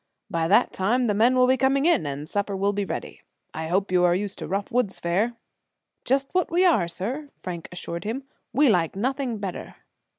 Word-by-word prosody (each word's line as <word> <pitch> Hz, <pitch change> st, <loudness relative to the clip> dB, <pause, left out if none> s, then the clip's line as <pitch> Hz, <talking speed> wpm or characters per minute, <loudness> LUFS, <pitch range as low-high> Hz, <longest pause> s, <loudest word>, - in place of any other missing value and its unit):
By 165 Hz, -3 st, 0 dB
that 210 Hz, +7 st, +4 dB
time 235 Hz, +7 st, +1 dB
the 210 Hz, -, +1 dB
men 230 Hz, +5 st, +4 dB
will 255 Hz, 0 st, +5 dB
be 260 Hz, +1 st, +3 dB
coming 270 Hz, +2 st, +2 dB
in, 330 Hz, -, +3 dB
and 145 Hz, +2 st, -5 dB
supper 200 Hz, +2 st, -2 dB
will 200 Hz, +1 st, +1 dB
be 200 Hz, 0 st, -1 dB
ready. -, -, -6 dB, 0.3 s
I 160 Hz, +1 st, -4 dB
hope 190 Hz, +3 st, 0 dB
you 180 Hz, -1 st, +3 dB
are 175 Hz, 0 st, +4 dB
used 200 Hz, +1 st, -3 dB
to -, -, -5 dB
rough 200 Hz, +4 st, -2 dB
woods 240 Hz, -5 st, 0 dB
fare." 200 Hz, +8 st, 0 dB, 0.7 s
"Just 270 Hz, +2 st, +1 dB
what 365 Hz, -1 st, +1 dB
we 355 Hz, +3 st, +3 dB
are, 330 Hz, -, +4 dB
sir," 235 Hz, -, -4 dB
Frank 175 Hz, -2 st, -6 dB
assured 170 Hz, -1 st, -5 dB
him. 235 Hz, +6 st, -3 dB, 0.3 s
"We 280 Hz, +5 st, +4 dB
like 175 Hz, -8 st, +2 dB
nothing 255 Hz, +2 st, -1 dB
better." 195 Hz, -3 st, -6 dB
205 Hz, 205 wpm, -25 LUFS, 180-255 Hz, 0.7 s, will